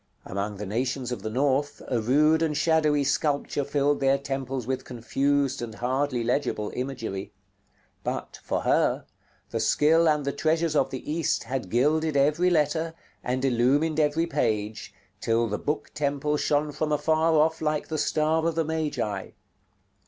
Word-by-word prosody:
Among 100 +2 -3
the 105 - -5
nations 125 +4 -2
of 125 - -4
the 110 - -4
North, 140 +4 0
a 120 -3 0
rude 150 +7 +3
and 155 -3 0
shadowy 150 -2 +3
sculpture 145 0 0
filled 145 0 +1
their 135 0 +3
temples 135 -2 -4
with 130 +1 -2
confused 135 +3 0
and 115 -2 -6
hardly 130 +1 -1
legible 115 -3 -1
imagery; 120 -7 -4 0.7
but, - - -4
for - - -2
her, - - +2 0.5
the 115 - -1
skill 155 +8 +4
and 150 -2 +1
the 140 - 0
treasures 160 +2 0
of 135 - +3
the 130 - -7
East 165 +1 0
had 120 -4 -4
gilded 150 - +2
every 150 +6 +3
letter, 160 0 +1 0.3
and 130 +2 -1
illumined 135 +6 +2
every 155 +2 +2
page, 110 -9 -2 0.3
till 115 +1 +1
the 105 -1 -3
Book 150 +1 -3
Temple 145 0 -1
shone 150 0 +1
from 155 +2 -2
afar 160 +2 +2
off 160 +1 +2
like 150 -1 -1
the 155 -1 -2
star 155 +2 +1
of 165 - -1
the 165 -1 +1
Magi. 150 -11 -2
145 Hz, 160 wpm, -26 LUFS, 125-155 Hz, 0.7 s, skill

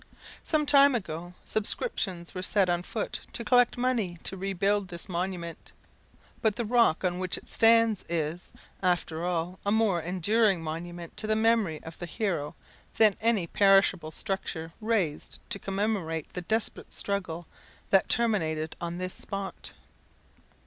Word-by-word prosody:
Some 305 -2 +1
time 280 -2 +6
ago 175 -4 -5
subscriptions 195 - 0
were 185 - -4
set 190 0 +2
on 175 0 0
foot 210 +4 -3
to 235 - -2
collect 245 +1 +4
money 235 -8 0
to - - -5
rebuild 195 +1 0
this 175 -1 -4
monument; 175 -2 -4 0.7
but 220 -2 +2
the 235 - -2
rock 230 -7 +3
on 180 -1 0
which 185 -1 -1
it - - -12
stands 230 -2 +4
is, 165 +1 -3 0.3
after 175 -3 0
all, 175 +1 -2
a 200 - 0
more 210 -5 +2
enduring 190 +2 +2
monument 170 +2 -6
to 215 - -3
the 215 - +2
memory 220 -8 +2
of 160 0 -10
the 175 - -5
hero 170 -6 -2 0.4
than 215 -3 +5
any 220 -5 +2
perishable 195 -3 +4
structure 165 -2 -4
raised 210 -9 -1
to 200 - -1
commemorate 195 -6 -2
the 180 - -4
desperate 220 +5 -3
struggle 185 -4 -2 0.5
that 195 - +4
terminated 160 -10 0
on 170 0 -3
this 185 0 -4
spot. 195 -1 -6
190 Hz, 145 wpm, -28 LUFS, 170-215 Hz, 0.7 s, time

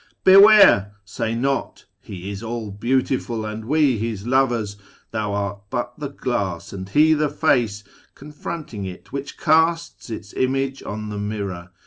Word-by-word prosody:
Beware! 195 - +7
say 110 +3 -3
not, 135 +3 -2
' - - -50
He 95 +1 -6
is 100 0 -6
All 115 -2 -5
Beautiful, 120 +1 -1
And 110 0 -6
we 140 -3 +2
His 110 -2 -4
lovers.' 120 -5 +1 0.3
Thou 110 -2 -2
art 100 0 -3
but 120 +2 -3
the 145 -2 -4
glass, 100 -12 -3
And 95 0 -7
He 155 +7 +5
the 150 -1 +1
Face 120 -10 +1
^ - - -28
confronting 150 -5 -7
it, 95 -1 -9
which 140 0 -5
casts 160 -2 +1
Its 105 -3 -7
image 135 +1 -1
on 105 0 -6
the 105 -1 -5
mirror. 100 -4 -4
115 Hz, 155 wpm, -22 LUFS, 100-140 Hz, 0.3 s, Beware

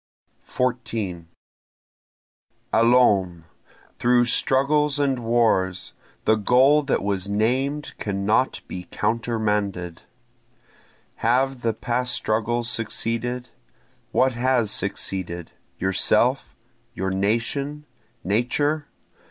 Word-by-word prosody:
14 115 -9 -3 1.5
Allons! 105 -8 +3 0.6
through 120 0 +4
struggles 140 +4 +2
and 140 -3 +1
wars! 115 -6 +1 0.3
The 110 - +4
goal 130 +7 +4
that 140 -7 -1
was 100 -1 -2
named 130 +8 0
cannot 105 +5 0
be 90 -1 -7
countermanded. 105 -6 -1 1.2
Have 130 +2 +1
the 115 -1 0
past 120 +1 -1
struggles 115 +2 0
succeeded? 120 +2 -2 0.6
What 130 0 +2
has 120 -3 +1
succeeded? 95 -5 -3 0.3
yourself? 110 +7 +1 0.4
your 95 -2 -2
nation? 120 +9 -1 0.4
Nature? 145 +9 0
115 Hz, 80 wpm, -23 LUFS, 100-130 Hz, 1.5 s, through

